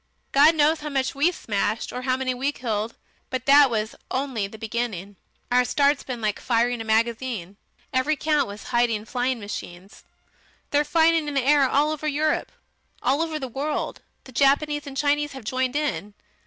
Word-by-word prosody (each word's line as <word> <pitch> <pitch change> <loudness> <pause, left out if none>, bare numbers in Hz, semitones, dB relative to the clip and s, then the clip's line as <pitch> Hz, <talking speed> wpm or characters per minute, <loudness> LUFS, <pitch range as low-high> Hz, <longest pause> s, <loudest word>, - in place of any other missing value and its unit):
God 300 +4 +6
knows 310 +1 +3
how 300 - -5
much 270 -2 -1
we 295 +6 +2
smashed 215 - -2
or 250 - -4
how 255 0 0
many 260 -1 -1
we 265 +3 -1
killed. 225 -4 -3 0.3
But 255 -1 -3
that 280 0 +7
was 220 -1 -2 0.2
only 255 -6 -2
the 220 - -11
beginning. 220 -4 -4 0.4
Our 250 0 +5
start's 280 +3 +2
been 250 -3 -6
like 215 -2 -1
firing 240 0 +1
a - - -3
magazine. 220 -3 -1 0.4
Every 260 +4 +2
country 300 -2 +1
was 205 +1 -9
hiding 235 -3 +2
flying 250 +1 -1
machines. 195 -2 -8 0.7
They're 290 +1 +3
fighting 325 +1 +3
in 290 - -4
the 275 - +2
air 280 -2 +4
all 295 +2 +2
over 310 0 -3
Europe 305 +1 0 0.5
all 275 +4 +2
over 320 -1 -1
the 270 -3 -4
world. 280 +5 -3 0.2
The 260 - -13
Japanese 285 +3 +2
and 270 -1 -7
Chinese 295 0 +1
have 265 -3 -9
joined 255 +3 -1
in. 280 -9 -2
260 Hz, 180 wpm, -24 LUFS, 230-290 Hz, 0.7 s, that